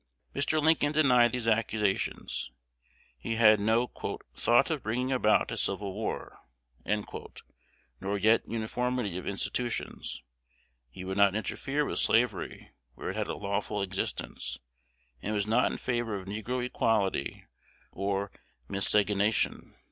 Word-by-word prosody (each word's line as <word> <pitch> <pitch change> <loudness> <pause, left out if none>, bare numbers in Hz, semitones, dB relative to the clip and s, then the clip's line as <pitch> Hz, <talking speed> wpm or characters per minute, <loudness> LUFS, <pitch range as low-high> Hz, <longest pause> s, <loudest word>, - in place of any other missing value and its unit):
Mr. 145 +3 +1
Lincoln 155 -1 +3
denied 125 -6 +5
these 120 -2 -3
accusations; 105 - 0 0.7
he 115 - -2
had 110 -2 +6
no 110 +4 +3 0.5
"thought 120 +7 +4
of 155 -4 -1
bringing 125 +5 -1
about 115 -5 +3
civil 100 -2 0
war," - - -4 1.6
nor 100 +1 -1
yet 110 +3 +4
uniformity 115 -2 -1
of - - -9
institutions: 115 - -3 0.7
he 80 +9 -9
would 95 +1 -3
not 100 -1 +5
interfere 135 +7 -1
with - - -2
slavery 115 -6 +1 0.2
where - - -4
it - - -7
had - - -1
a - - -3
lawful 100 0 -2
existence, 95 0 -3 0.6
and 105 +2 -2
was 100 -1 +1
not 115 +4 +3
in - - -4
favor 120 -4 -1
of 95 - -8
negro 110 +5 -3
equality 105 - 0 0.5
or 100 +1 -2 0.4
miscegenation. 105 +1 +1
110 Hz, 125 wpm, -30 LUFS, 100-125 Hz, 1.6 s, had